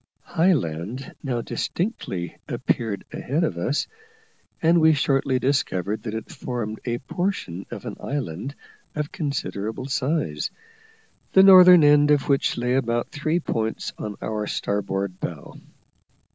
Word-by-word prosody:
High 180 +3 +3
land 105 - -3
now 125 -4 -2
distinctly 115 - -3
appeared 105 -4 -1
ahead 150 +6 -1
of 125 - 0
us, 140 - 0 0.7
and 165 +1 +4
we 160 0 +6
shortly 135 -2 +1
discovered 110 -7 0
that 110 -2 -5
it 110 - -6
formed 115 -4 -4
a 120 -1 -1
portion 130 - -3
of - - -8
an - - -6
island 135 - -4 0.4
of 150 -1 -3
considerable 130 -6 -3
size, 130 - -1 0.8
the 190 - +8
northern 180 -3 +9
end 145 0 +6
of 145 -2 +3
which 140 -1 +2
lay 125 +1 0
about 120 -2 0
three 155 +3 0
points 110 -8 -2
on 105 -1 -4
our 105 -1 -2
starboard 100 -2 -2
bow. 80 -5 -6
130 Hz, 130 wpm, -24 LUFS, 105-150 Hz, 0.8 s, northern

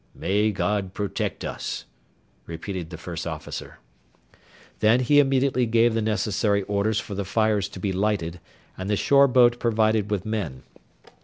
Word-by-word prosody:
"May 105 +3 +1
God 100 0 -2
protect 100 -1 -3
us!" - - -5 0.6
repeated 85 +1 -5
the 85 - -8
first 85 0 -6
officer. - - -7 1.0
Then 110 +4 +4
he 145 +4 +4
immediately 135 -2 +2
gave 115 +1 +3
the 115 - 0
necessary 105 -1 0
orders 105 +2 0
for 105 - -7
the 100 +1 -2
fires 105 0 +1
to 95 - -10
be 95 0 -1
lighted, 95 -4 -1 0.4
and 95 +1 -5
the 105 - +2
shore 140 +6 +5
boat 120 -2 +4
provided 110 -2 +1
with 100 -3 -2
men. 95 -13 -3
105 Hz, 150 wpm, -24 LUFS, 95-115 Hz, 1.0 s, shore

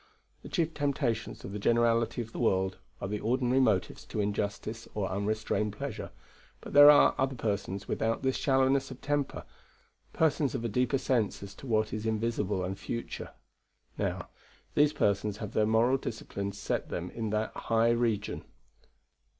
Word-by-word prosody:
"The - - -10
chief 165 -2 0
temptations 135 -6 -1
of - - -6
the 105 - -4
generality 115 +2 +2
of 115 - -13
the - - -7
world 95 -4 +1 0.2
are - - -3
the 105 +1 -2
ordinary 125 +3 +1
motives 95 -9 +1
to - - -5
injustice 105 +2 -2
or 100 -3 0
unrestrained 105 +1 -1
pleasure; - - -5 0.5
but - - -10
there 145 +1 +10
are 145 -1 +7
other 135 0 +1
persons 100 -3 -3
without 115 +3 -1
this 130 -1 +1
shallowness 135 0 +2
of 130 -1 -9
temper; 145 -1 -2 0.7
persons 150 -4 +1
of 120 -2 -3
a - - 0
deeper 125 +4 +1
sense 120 -7 0
as 100 0 -8
to 135 - -11
what 110 -2 +1
is 110 +1 -3
invisible 105 -3 -1
and 95 +2 -4
future. 115 +4 -5 0.7
Now, - - -3 0.4
these 150 0 +4
persons 105 -4 0
have 105 -1 -6
their 105 - +2
moral 115 +4 +3
discipline 100 -5 -4
set 100 0 -3
them 90 +1 -4
in 115 -2 -3
that 105 +1 -1
high 115 0 +2
region." 115 -3 0
115 Hz, 165 wpm, -30 LUFS, 105-130 Hz, 0.7 s, there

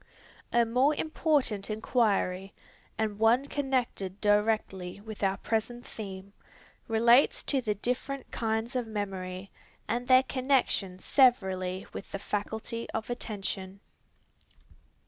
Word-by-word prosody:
A 235 0 +4
more 255 +6 +3
important 290 -11 0
inquiry, 205 -4 0 0.4
and 215 -2 -1
one 235 +5 +4
connected 255 -9 -2
directly 205 -3 +1
with 215 0 -9
our 195 -1 +1
present 240 +2 -2
theme, 195 -2 -8 0.5
relates 235 +4 +4
to 275 -3 +1
the 215 -4 -1
different 250 +5 -3
kinds 225 +2 -2
of 245 -2 -1
memory, 195 -3 -5 0.4
and 240 +3 -2
their 255 +1 +7
connection 255 -8 +1
severally 190 -6 +2
with - - -8
the - - -3
faculty 220 +3 -4
of 225 +2 -3
attention. 195 -4 -4
220 Hz, 110 wpm, -29 LUFS, 195-245 Hz, 0.5 s, their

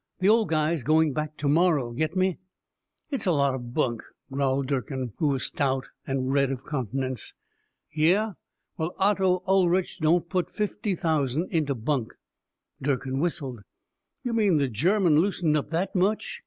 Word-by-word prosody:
The 190 +2 +2
old 225 0 +4
guy's 155 0 +1
going 155 +2 +3
back 150 +1 -3
to 145 - -2
morrow, 150 -5 +3
get 155 +7 -2
me?" 185 -1 +1 0.7
"It's 270 -7 -2
a - - +4
lot 140 -4 +2
of 120 -2 -6
bunk," 120 -7 0 0.3
growled 135 0 0
Durkin, 130 -3 -3
who 155 - +1
was 135 -2 0
stout 135 -2 -1 0.2
and 135 0 -1
red 140 -1 +3
of 135 0 -5
countenance. 130 -2 -3 0.6
"Yeh? 180 +8 +2 0.5
Well, 160 +2 -2
Otto 190 -2 +2
Ulrich 185 -1 +2
don't 165 +2 +2
put 180 -1 -1
fifty 210 -1 -2
thousand 160 -2 0
into 150 -4 +1
bunk." 120 0 -2 0.7
Durkin 135 -1 -1
whistled. 145 -7 -2 0.6
"You 245 - -2
mean 205 -7 +3
the 140 -2 +2
German 165 - +3
loosened 175 -4 +1
up 145 -1 -1
that 170 +4 -1
much?" 195 +3 0
155 Hz, 155 wpm, -26 LUFS, 135-180 Hz, 0.7 s, old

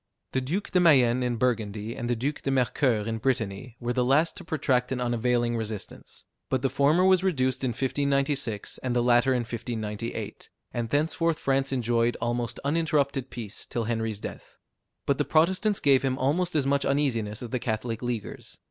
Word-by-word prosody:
The 130 - 0
Duke 170 +11 -3
de 180 - +4
Mayenne, 130 -8 +5
in 125 -1 0
Burgundy, 110 -2 -1
and 120 - -4
the 120 - +2
Duke 140 +6 -2
de - - -2
Mercoeur 125 -4 +1
in 115 0 -2
Brittany, 115 -2 -2
were 120 0 -2
the 125 0 +1
last 145 +6 +3
to - - -8
protract 130 -6 0
an 130 - -1
unavailing 120 0 +1
resistance; 110 -3 -6 0.2
but 130 -2 0
the 135 - +1
former 155 +6 +3
was 185 -1 +4
reduced 130 -9 0
in - - +2
1596, 135 -2 -1
and 125 -1 -2
the 120 - +2
latter 120 +1 +4
in 125 -2 +2
1598, 115 -1 -5 0.2
and 120 -1 -2
thenceforth 160 +3 +1
France 135 0 0
enjoyed 120 -2 +1
almost 120 0 -2
uninterrupted 140 -4 +1
peace 110 -3 -8
till 120 - -2
Henry's 110 -2 -2
death. - - -8 0.5
But 140 0 +1
the - - +3
Protestants 185 +8 +2
gave 135 -2 +4
him 130 -1 0
almost 160 +7 0
as 145 -3 +2
much 140 0 +2
uneasiness 115 -7 0
as 120 - -7
the 125 - -1
Catholic 115 0 -3
Leaguers. 120 -4 -5
125 Hz, 180 wpm, -27 LUFS, 115-140 Hz, 0.5 s, Mayenne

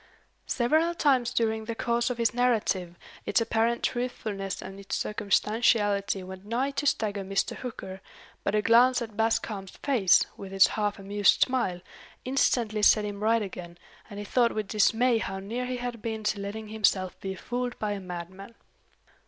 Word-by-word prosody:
Several 315 +8 +1
times 260 -6 +2
during 220 -1 0
the 230 0 -4
course 235 +1 0
of 250 - -3
his 230 -1 +1
narrative, 215 -8 0 0.3
its - - +3
apparent 230 +1 0
truthfulness 215 -6 -3
and 195 +1 -8
its 200 - -4
circumstantiality 205 -1 +1
went 190 0 -9
nigh 240 +6 -1
to 285 +1 -2
stagger 205 -6 0
Mr. 195 +1 -1
Hooker; 190 -6 -7 0.4
but 200 - 0
a 210 - +2
glance 245 +2 +5
at 220 -2 -9
Bascombe's 220 -3 -1
face, 230 -11 +4
with 195 -1 -9
its 195 0 +6
half 210 -1 -1
amused 200 0 +2
smile, 240 -9 -1 0.4
instantly 240 -4 +1
set 210 0 +5
him 205 -1 -5
right 225 +1 +2
again, 175 -3 -8 0.3
and 205 - -9
he 205 - -5
thought 235 +2 +2
with 215 -2 -2
dismay 225 +3 +3
how 195 -3 -4
near 230 +6 -4
he 255 0 -3
had 240 -2 -5
been 220 -1 -4
to 210 0 0
letting 210 +2 -6
himself 200 -4 0
be 190 0 -5
fooled 245 +4 -4
by 210 -1 -2
a 205 - -3
madman. 185 +4 -8
215 Hz, 170 wpm, -27 LUFS, 195-240 Hz, 0.4 s, its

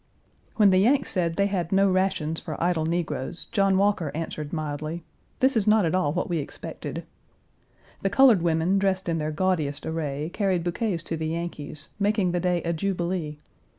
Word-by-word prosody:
When 205 -3 +5
the 185 - +5
Yanks 265 +7 +3
said 170 -3 0
they 200 - +2
had 185 -4 -1
no 195 +1 +4
rations 185 -4 0
for - - -6
idle 165 -2 +1
negroes, 165 -2 -3
John 195 -1 +3
Walker 195 -6 +1
answered 155 -2 -4
mildly, 155 +1 -4 0.4
"This 260 0 +4
is 215 -3 +1
not 210 -2 +5
at 165 - 0
all 185 -6 +2
what - - -1
we 170 -3 -1
expected." 145 - -6 1.0
The 195 - +1
colored 230 -2 +6
women, 170 +3 +2
dressed 190 -1 0
in 165 -1 0
their 155 0 -2
gaudiest 155 -4 -1
array, 155 -1 -3
carried 190 -4 0
bouquets 175 0 -1
to 165 - -4
the 160 0 -2
Yankees, 155 -2 -5
making 200 -3 +2
the 175 - 0
day 180 -1 0
a 170 - 0
jubilee. 175 -3 -2
175 Hz, 180 wpm, -26 LUFS, 160-195 Hz, 1.0 s, colored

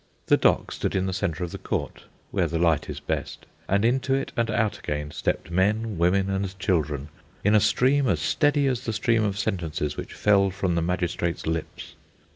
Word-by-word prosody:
The - - +5
dock - - +2
stood - - -2
in 95 0 +1
the 95 - -2
centre 90 -2 -2
of 85 - -4
the - - -7
court - - -4 0.3
(where 90 -4 +1
the 85 +1 -2
light 80 -2 +2
is - - -5
best), - - -4 0.2
and 100 +3 +2
into 135 +2 +2
it 135 - -2
and 115 -1 0
out 110 -1 0
again 75 0 -4
stepped 80 - -2
men, 105 +2 +1
women, 95 +3 +3
and 95 -1 -2
children, 80 -6 -1 0.3
in 105 - +3
a 105 - +7
stream 135 +6 +3
as 95 -9 +2
steady 145 - +2
as 125 -2 -1
the 115 - -1
stream 115 0 +2
of 100 -2 -1
sentences 80 -6 -2
which - - -7
fell 100 -2 +4
from 95 -1 -1
the 85 - +1
magistrate's 85 0 -1
lips. 80 0 -4
95 Hz, 200 wpm, -25 LUFS, 85-110 Hz, 0.3 s, a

